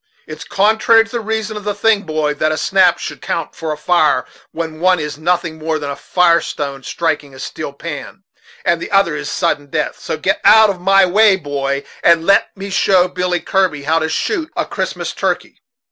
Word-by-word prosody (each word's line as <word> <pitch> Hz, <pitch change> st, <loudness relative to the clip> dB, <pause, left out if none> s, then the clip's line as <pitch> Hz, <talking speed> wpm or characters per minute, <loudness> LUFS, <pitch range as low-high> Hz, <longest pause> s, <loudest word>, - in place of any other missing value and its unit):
It's -, -, -8 dB
contrary 220 Hz, +3 st, +3 dB
to 225 Hz, -, -16 dB
the 240 Hz, -, -2 dB
reason 220 Hz, 0 st, -3 dB
of 210 Hz, -, -7 dB
the 205 Hz, 0 st, -2 dB
thing, 210 Hz, 0 st, +2 dB
boy, 155 Hz, -1 st, 0 dB
that 155 Hz, +1 st, 0 dB
a 155 Hz, -, -1 dB
snap 190 Hz, +1 st, +3 dB
should -, -, -7 dB
count 165 Hz, -2 st, -3 dB
for 160 Hz, -1 st, -5 dB
a 150 Hz, -, -4 dB
fire, 150 Hz, -4 st, +2 dB, 0.3 s
when 160 Hz, -1 st, -5 dB
one 185 Hz, +1 st, +3 dB
is 150 Hz, -1 st, -4 dB
nothing 165 Hz, -1 st, -1 dB
more 160 Hz, 0 st, -1 dB
than 145 Hz, -2 st, -5 dB
a -, -, -4 dB
fire 170 Hz, +2 st, +2 dB
stone 140 Hz, -2 st, -5 dB
striking 145 Hz, -1 st, -3 dB
a -, -, -12 dB
steel 155 Hz, +1 st, -6 dB
pan, 155 Hz, +5 st, -8 dB, 0.4 s
and 170 Hz, -1 st, +1 dB
the -, -, -5 dB
other 195 Hz, -6 st, +2 dB
is 150 Hz, 0 st, -5 dB
sudden 165 Hz, -5 st, -1 dB
death; -, -, -3 dB
so -, -, -4 dB
get -, -, -1 dB
out 220 Hz, -2 st, +7 dB
of 180 Hz, -2 st, -9 dB
my 195 Hz, +1 st, +5 dB
way, 205 Hz, +2 st, +4 dB
boy, 140 Hz, -4 st, -3 dB, 0.2 s
and 170 Hz, -1 st, +4 dB
let 200 Hz, +2 st, +4 dB
me 195 Hz, +1 st, -7 dB
show 185 Hz, -2 st, +3 dB
Billy 180 Hz, -1 st, -2 dB
Kirby 185 Hz, -7 st, 0 dB
how 160 Hz, +3 st, +1 dB
to 160 Hz, 0 st, -2 dB
shoot 330 Hz, -, -2 dB
a -, -, -1 dB
Christmas -, -, -4 dB
turkey." -, -, -3 dB
170 Hz, 205 wpm, -17 LUFS, 150-195 Hz, 0.4 s, out